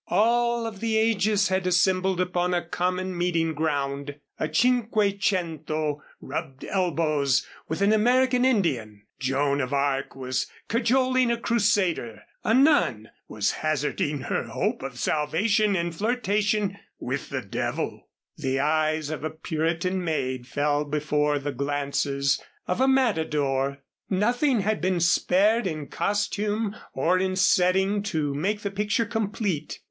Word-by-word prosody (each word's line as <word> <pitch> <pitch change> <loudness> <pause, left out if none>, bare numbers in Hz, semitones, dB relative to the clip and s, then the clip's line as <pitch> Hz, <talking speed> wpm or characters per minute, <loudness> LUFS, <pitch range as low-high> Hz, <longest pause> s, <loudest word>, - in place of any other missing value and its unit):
All 235 +1 +2
of 220 -3 -6
the 225 0 0
ages 210 -2 +2
had 190 0 0
assembled 185 +1 +2
upon 180 0 0
a 175 - -1
common 180 +2 -2
meeting 170 -2 0
ground; 140 -2 -2 0.2
a 155 - -2
cinquecento 190 - 0 0.2
rubbed 135 0 -6
elbows 155 -7 +1 0.2
with 160 +5 -2
an 205 +2 +4
American 250 +3 +3
Indian, 135 - 0 0.2
Joan 140 +2 +1
of 130 +1 -3
Arc 140 -1 0
was 130 -1 -2 0.2
cajoling 255 +2 +2
a 235 - +1
Crusader, 200 - 0 0.2
a - - +1
nun 245 - +3 0.2
was 105 -1 0
hazarding 150 -1 -1
her - - -2
hope - - -2
of 135 -2 -6
salvation 200 - +1
in 170 -1 -1
flirtation 210 0 0 0.2
with - - -4
the - - -3
devil, - - -3 0.3
the 135 -5 -1
eyes 155 +1 +1
of 155 - -5
a 155 - -1
Puritan 165 +3 -2
maid 130 -6 -2
fell 145 +3 0
before 150 0 0
the 145 +1 -3
glances 140 0 -1 0.2
of 180 +7 -1
a 265 - +4
matador. 150 - +1 0.3
Nothing 240 +5 +2
had 215 +2 -1
been 185 0 +1
spared 195 +6 +3
in 155 -4 -5
costume 205 +1 -1 0.2
or 175 +7 +1
in 185 0 0
setting 190 +2 +3
to 160 -8 -1
make 200 +9 -1
the 200 - -3
picture 210 +3 0
complete. 205 -7 -2
180 Hz, 130 wpm, -25 LUFS, 145-210 Hz, 0.3 s, an